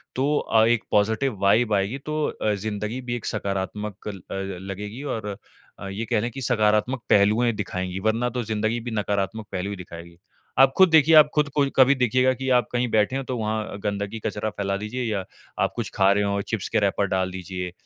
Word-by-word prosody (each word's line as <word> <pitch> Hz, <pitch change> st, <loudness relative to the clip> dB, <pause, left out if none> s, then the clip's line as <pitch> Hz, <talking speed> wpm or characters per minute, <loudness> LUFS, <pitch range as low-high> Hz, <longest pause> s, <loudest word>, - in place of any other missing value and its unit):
तो 145 Hz, +3 st, +1 dB
अ, 110 Hz, 0 st, +3 dB
एक 120 Hz, -1 st, +2 dB
positive 110 Hz, +4 st, +1 dB
vibe 110 Hz, +3 st, +3 dB
आएगी 100 Hz, +5 st, 0 dB
तो 155 Hz, 0 st, -1 dB
अ, 105 Hz, -, -1 dB
ज़िंदगी 105 Hz, +4 st, -4 dB
भी 120 Hz, -1 st, -3 dB
एक 120 Hz, -, -6 dB
सकारात्मक 100 Hz, +1 st, -4 dB
ल 100 Hz, -2 st, -5 dB
अ, -, -, -3 dB, 0.3 s
लगेगी 105 Hz, +7 st, -6 dB
और 110 Hz, -7 st, -4 dB, 0.5 s
अ, 100 Hz, -, -6 dB
ये 100 Hz, +4 st, -4 dB
कह 115 Hz, -2 st, +1 dB
ले 120 Hz, -, -1 dB
कि 135 Hz, +3 st, -8 dB
सकारात्मक 110 Hz, +1 st, +1 dB
पहलुएँ 105 Hz, +4 st, +4 dB
दिखाएँगी, 95 Hz, -3 st, -4 dB
वरना 110 Hz, +4 st, 0 dB
तो 125 Hz, -1 st, -3 dB
ज़िंदगी 110 Hz, +1 st, -1 dB
भी 120 Hz, +1 st, -6 dB
नकारात्मक 105 Hz, 0 st, -2 dB
पहलू 95 Hz, +1 st, -3 dB
ही 100 Hz, -, -4 dB
दिखाएगी। 85 Hz, -2 st, -11 dB, 0.4 s
आप 135 Hz, 0 st, +7 dB
खुद 190 Hz, -1 st, +7 dB
देखिए 160 Hz, 0 st, +6 dB
आप 150 Hz, -1 st, +8 dB
खुद 150 Hz, -1 st, +2 dB
को 145 Hz, -1 st, +4 dB
कभी 135 Hz, +1 st, +6 dB
देखिएगा 130 Hz, 0 st, +2 dB
कि 130 Hz, +1 st, -4 dB
आप 125 Hz, -1 st, +3 dB
कहीं 125 Hz, 0 st, 0 dB
बैठे 110 Hz, +4 st, +2 dB
हो, 135 Hz, -, -2 dB
तो 130 Hz, -1 st, -4 dB
वहाँ 110 Hz, -2 st, -3 dB
गंदगी 100 Hz, +2 st, -3 dB
कचरा 105 Hz, 0 st, -3 dB
फैला 100 Hz, -2 st, -2 dB
दीजिए 105 Hz, +5 st, -4 dB
या 105 Hz, -5 st, -1 dB, 0.4 s
आप -, -, -1 dB
कुछ -, -, -3 dB
खा 95 Hz, 0 st, +4 dB
रहे 105 Hz, +1 st, +2 dB
हो, 100 Hz, 0 st, 0 dB
चिप्स 105 Hz, -1 st, -4 dB
के -, -, +2 dB
रैपर 100 Hz, 0 st, +1 dB
डाल 95 Hz, 0 st, -1 dB
दीजिए 90 Hz, -1 st, -5 dB
110 Hz, 210 wpm, -24 LUFS, 100-125 Hz, 0.5 s, आप